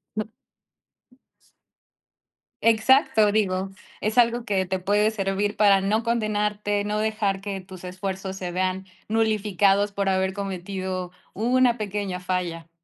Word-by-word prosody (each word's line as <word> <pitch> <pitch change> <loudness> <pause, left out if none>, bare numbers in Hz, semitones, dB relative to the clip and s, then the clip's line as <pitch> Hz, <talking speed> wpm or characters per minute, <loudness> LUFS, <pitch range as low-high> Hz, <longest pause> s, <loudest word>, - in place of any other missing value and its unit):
No 215 0 -3 2.3
Exacto, 225 -1 +4
digo, 195 -2 0 0.3
es 215 +3 -1
algo 240 0 +4
que 195 -5 0
te 190 0 -2
puede 205 +3 +2
servir 200 0 -1
para 200 -2 +5
no 215 +4 0
condenarte, 210 -3 0
no 210 +1 -1
dejar 215 -3 0
que 195 -1 -5
tus 185 -1 -11
esfuerzos 190 +1 -5
se 180 -2 -5
vean 185 +1 -1 0.2
nulificados 205 -2 +2
por 200 -1 0
haber 190 0 +1
cometido 185 -2 -4 0.2
una 245 +2 +2
pequeña 200 -3 -3
falla. 180 -2 -3
200 Hz, 120 wpm, -24 LUFS, 190-215 Hz, 2.3 s, para